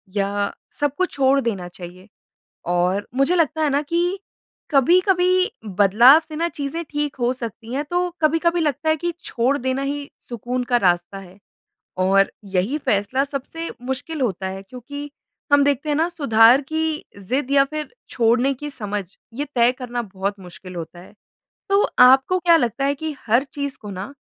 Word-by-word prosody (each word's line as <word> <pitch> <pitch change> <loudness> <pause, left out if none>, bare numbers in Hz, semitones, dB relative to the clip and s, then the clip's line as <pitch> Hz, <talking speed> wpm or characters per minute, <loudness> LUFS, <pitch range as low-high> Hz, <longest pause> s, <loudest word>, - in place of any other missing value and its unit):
या 200 0 -1 0.3
सब 290 -1 0
कुछ 370 -1 0
छोड़ 275 0 +3
देना 200 -7 -3
चाहिए। 180 +2 -11 0.6
और 180 +3 0
मुझे 275 +7 +2
लगता 320 -1 +1
है 300 - +2
ना 280 +1 +1
कि 345 +5 -1 0.5
कभी-कभी 365 - +3
बदलाव 210 - +6
से 310 - -8
ना 335 +2 0
चीज़ें 300 +2 -4
ठीक 295 -1 -2
हो 240 +1 +1
सकती 235 -1 -7
हैं, 285 +3 -1
तो 355 +3 -1
कभी-कभी 330 +3 +2
लगता 300 0 0
है 315 - +4
कि 345 +3 -2
छोड़ 250 +4 0
देना 260 0 -2
ही 285 +1 -4 0.2
सुकून 245 +2 -3
का 245 0 +2
रास्ता 175 -2 +1
है। 185 0 -14 0.6
और 195 +1 +3
यही 195 +9 -1
फ़ैसला 260 +2 0
सबसे 285 +4 -6
मुश्किल 265 +5 -4
होता 195 -7 -1
है, 190 +1 -7
क्योंकि 280 +7 -9 0.4
हम 285 0 +6
देखते 285 +1 0
हैं 295 - +1
ना 325 +3 +2
सुधार 250 -7 +5
की 315 +2 -2
ज़िद 255 +8 -2
या 280 -1 +5
फिर 305 +8 -6 0.2
छोड़ने 245 +3 +2
की 295 +3 -7
समझ, 210 -6 -4 0.3
ये 285 +4 -2
तय 240 +1 +4
करना 245 -2 -5
बहुत 200 -1 -4
मुश्किल 185 0 -11
होता 170 +1 -7
है। 190 - -16 0.6
तो 395 +1 +4 0.2
आपको 265 +8 +6
क्या 340 -1 +5
लगता 240 0 -1
है 280 +1 +1
कि 310 +1 -5
हर 235 +5 +4
चीज़ 280 -1 -6
को 210 - -8
ना 195 +7 -7
265 Hz, 175 wpm, -21 LUFS, 205-300 Hz, 0.6 s, बदलाव